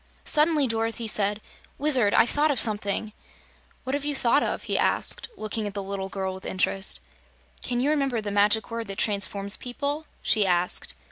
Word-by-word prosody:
Suddenly 300 -1 +3
Dorothy 225 0 -2
said: 210 0 0 0.4
"Wizard, 260 -8 +3
I've - - +4
thought 300 +1 +2
of 275 -5 +1
something!" 210 -1 0 0.7
"What 260 - -4
have 285 0 -1
you 290 0 -2
thought 260 +2 +2
of?" - - -2
he - - -3
asked, - - +4
looking 215 0 -3
at 205 - -7
the 200 - -3
little 195 0 -5
girl 190 -1 -3
with 190 +1 -10
interest. 190 +1 -2 0.6
"Can 245 -1 -2
you 275 +4 +1
remember 275 -6 0
the 210 -1 -4
Magic 205 +2 +2
Word 230 -1 -4
that 195 0 -6
transforms 200 -1 -1
people?" 285 +5 -4 0.2
she 215 - +3
asked. 180 0 +1
220 Hz, 180 wpm, -25 LUFS, 200-270 Hz, 0.7 s, I've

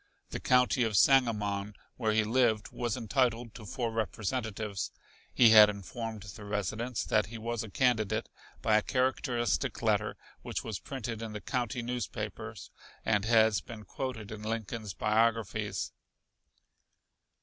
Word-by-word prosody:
The - - -3
County 125 0 +3
of 110 -4 +2
Sangamon, 105 -6 +3 0.2
where 110 -3 0
he 110 0 +3
lived, 110 -1 +2
was 120 -2 -2
entitled 120 -1 0
to 110 -3 -10
four 120 0 -2
representatives. 110 -1 -2 0.4
He 115 -3 +6
had 105 -1 +10
informed 105 +2 -5
the 100 +2 -10
residents 105 +4 -2
that 105 -4 +2
he 115 +2 -7
was 115 0 -3
a 110 - -6
candidate 110 -1 +1 0.4
by 110 -1 +4
a - - +3
characteristic 125 -1 0
letter - - +1 0.2
which - - -4
was 110 -4 -4
printed 115 -4 -5
in 110 -2 -5
the 105 - -4
county 120 +2 -2
newspapers 120 -2 -5 0.3
and 105 -2 +2
has 110 -4 +4
been 110 +2 -10
quoted 110 -1 -5
in 110 -1 -7
Lincoln's 110 -1 -4
biographies. 110 -1 0
110 Hz, 140 wpm, -31 LUFS, 105-120 Hz, 0.4 s, had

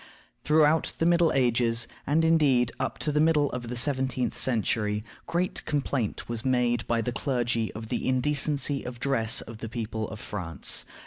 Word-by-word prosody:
Throughout 155 +1 +3
the 165 - 0
Middle 170 -1 +4
Ages, 120 -2 +1 0.2
and, 160 +4 +2
indeed, 140 -7 +3
up - - -2
to 150 - -1
the 150 - +1
middle 150 -3 +3
of 120 -1 -5
the 125 - -4
seventeenth 130 0 0
century, 105 -3 0 0.2
great 180 +2 -1
complaint 140 -6 -2
was 115 -1 -3
made 125 -2 +1
by 115 -1 +1
the 125 - -2
clergy 120 -3 -1
of 110 0 -8
the - - -2
indecency 140 +1 +1
of 125 0 -6
the 120 - -17
dress 115 -5 +2
of 110 -1 -10
the 115 - -6
people 110 -2 -4
of 110 - -8
France. 90 -7 -1
125 Hz, 175 wpm, -27 LUFS, 115-145 Hz, 0.2 s, Middle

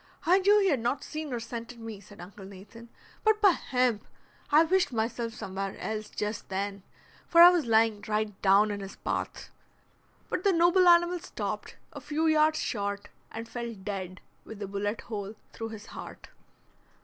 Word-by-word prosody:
"I 360 +4 +5
knew 405 +2 +5
he 390 - +3
had 280 -7 +2
not 240 +4 -1
seen 305 -2 -6
or 240 - -2
scented 235 +1 -7
me," 225 -3 -7
said 205 +1 -16
Uncle 190 +3 -11
Nathan, 200 +5 -12 0.3
"but, 435 -1 +3
by 405 -3 +6
hemp, 250 -8 0 0.5
I 305 +2 +7
wished 360 -2 +2
myself 230 0 -2
somewhere 195 -1 -5
else 215 -1 -4
just 210 +1 -4
then; 200 +1 -3 0.5
for 335 - +3
I 350 +1 +11
was 340 -8 0
lying 220 -2 +3
right 210 -2 -2
down 200 +2 +4
in 205 - -4
his 195 0 -8
path." - - -4 0.8
But 365 - -3
the 395 - +4
noble 350 +2 +4
animal 345 +1 +5
stopped, 365 - -5 0.2
a - - -8
few 310 +2 -1
yards 310 0 +4
short, 200 -5 -3 0.2
and 225 +1 -7
fell 235 -1 -5
dead 190 -2 -6 0.2
with 220 - -10
a - - -4
bullet 205 +2 -3
hole 210 -1 -6 0.2
through 225 0 -5
his 220 -1 -9
heart. - - -10
230 Hz, 175 wpm, -28 LUFS, 205-310 Hz, 0.8 s, I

